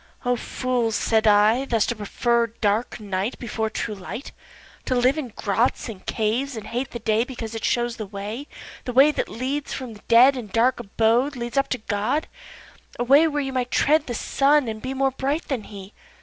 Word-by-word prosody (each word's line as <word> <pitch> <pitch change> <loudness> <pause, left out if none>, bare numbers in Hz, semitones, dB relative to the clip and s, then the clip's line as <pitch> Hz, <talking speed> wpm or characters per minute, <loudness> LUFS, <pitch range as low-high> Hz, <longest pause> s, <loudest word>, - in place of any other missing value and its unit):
O 245 0 +2
fools 245 -2 -1
(said 220 0 +2
I,) 215 +5 +4
thus 230 -5 +1
to 240 - -2
prefer 235 +3 0
dark 220 +1 -1
night 200 +2 -3
Before 220 -2 -3
true 215 0 -3
light, 205 +7 -7 0.5
To 255 - 0
live 250 +3 +3
in 305 -5 -3
grots, 225 +3 -1
and 200 -4 -9
caves, 240 +5 -1
and 215 - -7
hate 245 +3 -3
the - - -6
day 220 -1 +1
Because 240 -3 -7
it 225 - -5
shows 240 -1 0
the 215 - -5
way, 210 +8 -6 0.4
The 250 - -3
way 275 +4 +6
which 275 +1 -3
from 255 -4 -5
the 205 - -14
dead 250 +4 +7
and 230 -6 -7
dark 235 +4 +2
abode 230 +7 +1
Leads 240 -1 -5
up 275 0 +2
to 255 - 0
God, 220 +7 -1 0.7
A - - 0
way 280 +6 +6
where 295 -2 -1
you 270 -1 -4
might 250 -1 -1
tread 305 +5 +2
the 240 - -3
Sun, 280 +3 +2
and 220 -1 -5
be 260 +2 -4
More 270 0 +2
bright 280 +5 -2
than 255 -7 -2
he. 200 -1 -10
240 Hz, 200 wpm, -23 LUFS, 220-265 Hz, 0.7 s, dead